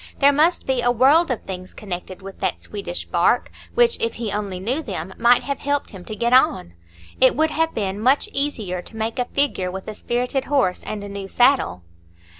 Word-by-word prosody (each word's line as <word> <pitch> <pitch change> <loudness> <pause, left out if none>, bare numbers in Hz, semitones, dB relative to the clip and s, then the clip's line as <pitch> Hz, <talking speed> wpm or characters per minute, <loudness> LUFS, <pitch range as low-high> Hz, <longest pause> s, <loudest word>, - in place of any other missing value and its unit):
There 285 0 +5
must 315 +5 +2
be 260 -2 0
a 245 - +2
world 275 +8 +4
of 250 - -2
things 185 -1 -8
connected 185 -1 -7
with 195 0 -10
that - - -1
Swedish 200 -4 -6
bark, 175 +7 +1 0.2
which, 480 0 +3
if 230 - -1
he 225 -3 -4
only 200 -3 -3
knew 245 +11 -1
them, 190 - -5
might 240 +1 +5
have 280 0 -3
helped 285 0 -1
him 190 -3 -10
to 215 - -6
get 235 +3 0
on. 90 - +3 0.5
It 260 - +5
would 315 +1 +2
have 325 +1 0
been 200 -2 -2
much 260 +6 +3
easier 215 -11 -2
to 225 - -12
make 225 +3 -2
a 250 - +1
figure 250 -9 0
with 190 +1 -7
a 215 - -4
spirited 245 +4 -2
horse 260 -11 +1
and 210 -1 -5
a - - -6
new 200 -1 -6
saddle. 240 - +2
230 Hz, 210 wpm, -22 LUFS, 190-275 Hz, 0.5 s, There